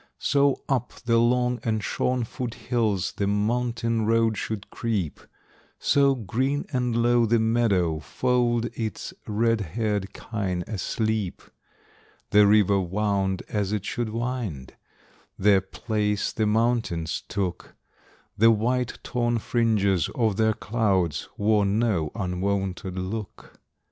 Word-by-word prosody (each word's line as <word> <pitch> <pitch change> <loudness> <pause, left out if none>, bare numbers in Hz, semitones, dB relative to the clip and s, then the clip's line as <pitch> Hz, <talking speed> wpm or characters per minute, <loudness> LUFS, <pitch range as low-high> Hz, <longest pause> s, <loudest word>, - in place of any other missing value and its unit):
So 140 -1 +2
up 130 -3 -1
the 115 -1 +3
long 125 +1 +2
and 110 -2 -1
shorn 125 +3 0
foot 125 0 -5
hills 110 -7 0
The 100 - 0
mountain 115 +1 0
road 115 -1 +3
should 105 0 -5
creep; 105 -9 -2 0.6
So, 140 -1 +3
green 130 +6 -1
and 125 -2 0
low, 120 -1 +4
the 115 +2 +3
meadow 110 -8 +2
fold 120 +5 +1
Its 110 -5 -4
red 115 +1 +1
haired 100 +1 -2
kine 95 -6 -3
asleep. 110 -1 -2 0.9
The 105 0 +6
river 100 -1 +4
wound 95 0 -1
as 105 -2 -1
it 105 -2 -2
should 120 -2 -2
wind; 115 - -4 0.6
Their 100 -1 +4
place 105 +1 -1
the 110 -1 0
mountains 110 -7 0
took; 95 -4 -4 0.6
The 115 +2 +5
white 120 +3 +1
torn 120 -1 0
fringes 105 - +1
of 110 -5 +1
their 110 +1 +2
clouds 95 -9 0
Wore 105 0 +3
no 100 -5 +1
unwonted 95 -1 -2
look. 95 +3 -6
110 Hz, 120 wpm, -25 LUFS, 100-120 Hz, 0.9 s, The